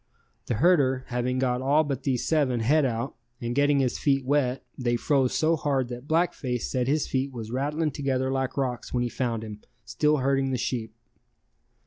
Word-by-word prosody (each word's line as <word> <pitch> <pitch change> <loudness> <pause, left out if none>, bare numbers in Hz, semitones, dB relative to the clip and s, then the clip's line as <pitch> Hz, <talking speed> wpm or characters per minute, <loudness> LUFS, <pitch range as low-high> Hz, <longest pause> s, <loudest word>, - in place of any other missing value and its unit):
The 120 - 0
herder 135 -3 +3
having 125 +1 -1
got 125 -1 0
all 145 +4 +3
but 140 -3 -3
these 130 -3 -1
seven 140 -7 +1
head 145 +6 +3
out 120 +1 -2 0.3
and 120 0 -3
getting 145 +2 +3
his 125 -2 -1
feet 135 -2 +1
wet 135 -2 +1
they 120 -2 0
froze 130 0 +1
so 160 +1 +3
hard 135 -5 0
that 125 +2 -7
Black 165 +3 +2
Face 125 -4 -3
said 125 -1 -1
his 150 +2 +1
feet 135 +1 -1
was 115 -3 -7
rattling 150 +4 -1
together 130 -1 -1
like 135 0 -2
rocks 125 -3 -2
when 125 -1 0
he 120 - -1
found 115 -3 -2
him 105 -1 -8 0.2
still 150 +7 +2
herding 135 0 +1
the 130 - 0
sheep. 115 -2 -3
130 Hz, 190 wpm, -26 LUFS, 125-145 Hz, 0.3 s, herder